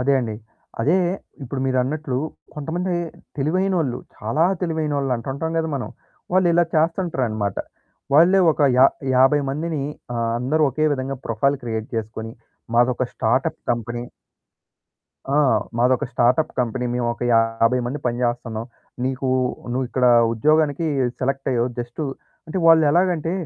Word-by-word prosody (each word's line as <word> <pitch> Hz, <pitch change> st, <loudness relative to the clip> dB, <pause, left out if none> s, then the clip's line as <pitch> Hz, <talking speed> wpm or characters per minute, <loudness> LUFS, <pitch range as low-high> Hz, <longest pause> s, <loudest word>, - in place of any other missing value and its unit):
అదే 140 Hz, +2 st, +3 dB
అండి. 115 Hz, -3 st, -3 dB, 0.5 s
అదే 150 Hz, +10 st, +3 dB, 0.5 s
ఇప్పుడు 130 Hz, +1 st, -4 dB
మీరన్నట్లు 130 Hz, +2 st, -1 dB, 0.4 s
కొంతమంది 170 Hz, +5 st, -3 dB, 0.4 s
తెలివైనోళ్ళు, 160 Hz, -2 st, 0 dB, 0.2 s
చాలా 115 Hz, +10 st, 0 dB, 0.2 s
తెలివైనోళ్ళు 150 Hz, -5 st, -1 dB
అంటుంటాం 140 Hz, +7 st, -4 dB
కదా! 160 Hz, 0 st, -1 dB
మనం 130 Hz, -, -4 dB, 0.4 s
వాళ్ళు 185 Hz, 0 st, +4 dB
ఇలా 175 Hz, +1 st, +4 dB
చేస్తుంటరనమాట. 135 Hz, -, 0 dB, 0.6 s
వాళ్ళే 175 Hz, +6 st, +6 dB
ఒక -, -, -7 dB, 0.2 s
యా 130 Hz, -, +9 dB, 0.3 s
యాభై 135 Hz, +3 st, +5 dB
మందిని 155 Hz, +1 st, -2 dB, 0.3 s
ఆహ్, 115 Hz, -1 st, 0 dB
అందరూ 140 Hz, +6 st, +1 dB
ఒకే 155 Hz, +4 st, -1 dB
విధంగా 135 Hz, 0 st, -4 dB
ప్రొఫైల్ 140 Hz, +5 st, +1 dB
క్రియేట్ 110 Hz, -2 st, -3 dB
చేసుకొని 110 Hz, 0 st, -4 dB, 0.4 s
మాదొక 125 Hz, +1 st, +3 dB
స్టార్టప్ 120 Hz, +4 st, 0 dB
కంపెనీ. 120 Hz, 0 st, -2 dB, 1.3 s
ఆ! -, -, +2 dB, 0.4 s
మాదొక 130 Hz, +3 st, +2 dB
స్టార్టప్ 125 Hz, +6 st, +2 dB
కంపెనీ 125 Hz, 0 st, -1 dB
మేము 125 Hz, -1 st, -1 dB
ఒక 120 Hz, -, -8 dB
50 115 Hz, +2 st, +3 dB
మంది 135 Hz, +4 st, -3 dB
పజేచేస్తున్నాం. 120 Hz, -2 st, -2 dB, 0.4 s
"నీకు 130 Hz, 0 st, -2 dB, 0.4 s
నువ్వు 130 Hz, +1 st, 0 dB
ఇక్కడ 125 Hz, 0 st, +1 dB, 0.3 s
ఉద్యోగానికి 155 Hz, +5 st, +2 dB, 0.3 s
సెలెక్ట్ 135 Hz, +1 st, -1 dB
అయ్యావు 120 Hz, -1 st, +1 dB
జస్ట్" 120 Hz, +4 st, -5 dB, 0.5 s
అంటే 160 Hz, +4 st, -3 dB
వాళ్ళు 165 Hz, -1 st, +7 dB
ఎలాగంటే 170 Hz, -1 st, +1 dB
130 Hz, 125 wpm, -22 LUFS, 120-155 Hz, 1.3 s, యా